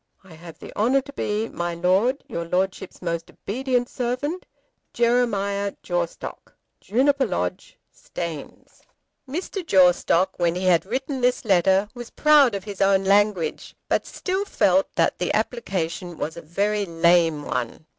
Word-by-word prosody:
I 190 Hz, -3 st, -15 dB
have 165 Hz, 0 st, -12 dB
the -, -, -11 dB
honour 255 Hz, +6 st, +2 dB
to 280 Hz, +1 st, -12 dB
be, 215 Hz, -3 st, -2 dB
My 175 Hz, -3 st, -4 dB
Lord, 190 Hz, +10 st, +1 dB
Your 170 Hz, -, -4 dB
Lordship's 185 Hz, +2 st, -2 dB
most 170 Hz, -1 st, -3 dB
obedient 250 Hz, +2 st, -2 dB
Servant, 255 Hz, +10 st, -3 dB, 0.5 s
JEREMIAH 200 Hz, -5 st, +1 dB
JAWSTOCK. 175 Hz, -2 st, -4 dB, 0.2 s
Juniper 270 Hz, +3 st, +2 dB
Lodge, 90 Hz, -, -4 dB, 0.2 s
Staines. 165 Hz, -4 st, -8 dB, 0.5 s
Mr. 365 Hz, +6 st, -4 dB
Jawstock, 185 Hz, -, +3 dB
when 170 Hz, -1 st, +1 dB
he 180 Hz, -, -3 dB
had 180 Hz, 0 st, +3 dB
written 265 Hz, +3 st, -3 dB
this 250 Hz, 0 st, +1 dB
letter, 190 Hz, 0 st, +3 dB
was 240 Hz, -2 st, -8 dB
proud 295 Hz, -7 st, +4 dB
of 195 Hz, -, -4 dB
his 205 Hz, -2 st, -7 dB
own 195 Hz, 0 st, +4 dB
language, 195 Hz, -4 st, +1 dB
but -, -, 0 dB
still 380 Hz, +1 st, -2 dB
felt 190 Hz, -, +2 dB
that -, -, +1 dB
the 180 Hz, -, 0 dB
application 185 Hz, -7 st, -3 dB
was 160 Hz, -, -4 dB
a 170 Hz, -, -8 dB
very 200 Hz, +5 st, -1 dB
lame 165 Hz, -2 st, +3 dB
one. 120 Hz, +5 st, -4 dB
195 Hz, 145 wpm, -23 LUFS, 175-245 Hz, 0.5 s, proud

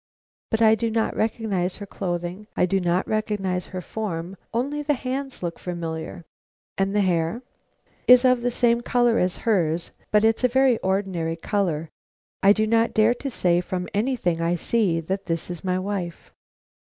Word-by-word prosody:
But 220 Hz, +1 st, +1 dB
I 220 Hz, 0 st, +7 dB
do 225 Hz, +1 st, 0 dB
not 225 Hz, 0 st, 0 dB
recognize 205 Hz, -5 st, -1 dB
her 205 Hz, -, -7 dB
clothing; 180 Hz, +1 st, -4 dB
I -, -, +4 dB
do 195 Hz, +2 st, +1 dB
not 175 Hz, 0 st, 0 dB
recognize 200 Hz, -4 st, -1 dB
her 185 Hz, -1 st, -5 dB
form; 180 Hz, -3 st, -4 dB, 0.2 s
only 275 Hz, +6 st, -1 dB
the 295 Hz, 0 st, +1 dB
hands 265 Hz, -2 st, -4 dB
look 170 Hz, -1 st, -4 dB
familiar." 170 Hz, -1 st, -5 dB, 0.5 s
"And 195 Hz, +1 st, 0 dB
the 205 Hz, -, +4 dB
hair?" 180 Hz, +5 st, 0 dB, 0.6 s
"Is 250 Hz, +1 st, +8 dB
of 255 Hz, -1 st, +4 dB
the 245 Hz, -, +1 dB
same 235 Hz, -1 st, +2 dB
color 240 Hz, -1 st, +2 dB
as 180 Hz, 0 st, 0 dB
hers, 170 Hz, -7 st, +1 dB, 0.2 s
but 210 Hz, 0 st, +4 dB
it's 225 Hz, +2 st, +2 dB
a -, -, +6 dB
very 260 Hz, -1 st, +3 dB
ordinary 190 Hz, -4 st, -1 dB
color. 165 Hz, -3 st, -1 dB, 0.5 s
I 195 Hz, -, +6 dB
do 215 Hz, +1 st, +3 dB
not 230 Hz, +1 st, +2 dB
dare 220 Hz, +2 st, +5 dB
to 275 Hz, +3 st, -5 dB
say 175 Hz, -7 st, +2 dB
from 180 Hz, 0 st, -4 dB
anything 205 Hz, -6 st, 0 dB
I 170 Hz, +1 st, +1 dB
see 180 Hz, -2 st, +1 dB
that 190 Hz, +4 st, -4 dB
this 165 Hz, 0 st, -2 dB
is 175 Hz, -, -7 dB
my 185 Hz, -1 st, 0 dB
wife." 185 Hz, -3 st, -4 dB
195 Hz, 175 wpm, -24 LUFS, 175-230 Hz, 0.6 s, Is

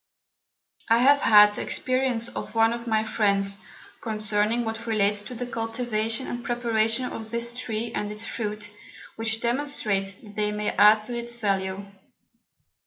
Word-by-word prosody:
I 230 Hz, -, +6 dB
have 280 Hz, +4 st, +5 dB
had 210 Hz, -1 st, +7 dB
the -, -, -5 dB
Experience 255 Hz, -3 st, 0 dB
of 230 Hz, -, -7 dB
one 225 Hz, 0 st, +4 dB
of 235 Hz, 0 st, -6 dB
my 220 Hz, -1 st, +2 dB
Friends, 200 Hz, -2 st, 0 dB, 0.4 s
concerning 215 Hz, +1 st, 0 dB
what 225 Hz, +1 st, -5 dB
relates 205 Hz, -2 st, +1 dB
to 245 Hz, +4 st, -9 dB
the 245 Hz, +1 st, -4 dB
Cultivation 225 Hz, 0 st, -2 dB
and 240 Hz, 0 st, -5 dB
Preparation 230 Hz, 0 st, 0 dB
of 220 Hz, -3 st, -6 dB
this 235 Hz, +1 st, -2 dB
Tree 230 Hz, -2 st, -4 dB
and 210 Hz, 0 st, -3 dB
its 210 Hz, +1 st, -5 dB
Fruit, 210 Hz, -2 st, -4 dB, 0.4 s
which 225 Hz, 0 st, -2 dB
demonstrates 235 Hz, -7 st, 0 dB
that 205 Hz, 0 st, -15 dB
they 210 Hz, 0 st, 0 dB
may 210 Hz, 0 st, -2 dB
add 215 Hz, +1 st, +5 dB
to 245 Hz, -, -5 dB
its 235 Hz, 0 st, -4 dB
Value. 195 Hz, -3 st, -2 dB
225 Hz, 155 wpm, -25 LUFS, 210-235 Hz, 0.4 s, had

